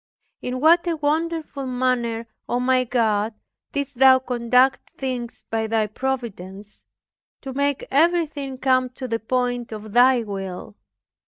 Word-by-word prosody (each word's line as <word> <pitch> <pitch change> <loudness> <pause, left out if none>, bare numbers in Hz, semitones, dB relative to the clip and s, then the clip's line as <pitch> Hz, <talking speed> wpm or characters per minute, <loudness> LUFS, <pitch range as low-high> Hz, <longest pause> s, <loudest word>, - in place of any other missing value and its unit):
In 250 +1 -3
what 335 +5 +5
a 335 - +1
wonderful 310 -2 -2
manner, 245 -2 -1 0.2
O 245 - +1
my 255 0 +2
God, 220 -3 0 0.4
didst 280 -3 -4
Thou 265 -1 +8
conduct 250 +1 +1
things 250 -3 -4
by 220 0 0
Thy 220 -1 +1
Providence, 210 -5 -5 0.6
to 265 -2 -6
make 280 0 -1
everything 295 -3 +1
come 255 -1 +2
to 255 +1 -7
the 230 -1 -1
point 245 +1 -1
of 215 -1 -7
Thy 250 0 +5
will! 195 -1 -6
255 Hz, 135 wpm, -23 LUFS, 230-270 Hz, 0.6 s, Thou